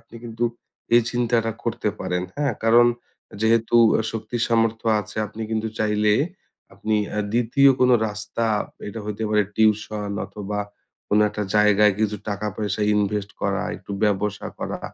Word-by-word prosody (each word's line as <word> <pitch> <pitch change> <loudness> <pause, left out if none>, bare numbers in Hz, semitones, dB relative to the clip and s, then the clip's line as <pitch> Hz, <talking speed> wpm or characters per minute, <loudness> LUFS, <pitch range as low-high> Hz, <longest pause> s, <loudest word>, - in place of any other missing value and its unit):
আপনি 115 0 -15
কিন্তু 115 0 -3 0.5
এই 120 - +7
চিন্তাটা 120 -2 +1
করতে 115 -2 -1
পারেন, 90 -1 -1
হ্যাঁ? 140 -4 0
কারণ 120 +1 +6 0.5
যেহেতু 115 +1 +3 0.2
অ্যা - - +2
শক্তি 115 +1 -4
সামর্থ্য 115 -1 +1
আছে 105 +1 -11
আপনি 110 +2 -8
কিন্তু 110 0 -1
চাইলে 105 0 +2 0.6
আপনি 110 +3 -2 0.2
অ্যা 105 - -1
২য় 120 +4 +4
কোনো 125 -1 +5
রাস্তা, 105 +2 -4 0.4
এইটা 110 +2 -6
হইতে 105 +1 -4
পারে 105 0 +4
টিউশন 105 -1 +1 0.2
অথবা 105 0 -5 0.5
কোনো 105 +1 +3
একটা 105 0 -4
জায়গায় 105 0 +5
কিছু 105 -1 0
টাকা-পয়সা 105 0 -2
ইনভেস্ট 105 0 0
করা, - - 0
একটু - - -14
ব্যবসা 105 0 -1
করা। - - -4
110 Hz, 145 wpm, -23 LUFS, 105-115 Hz, 0.6 s, এই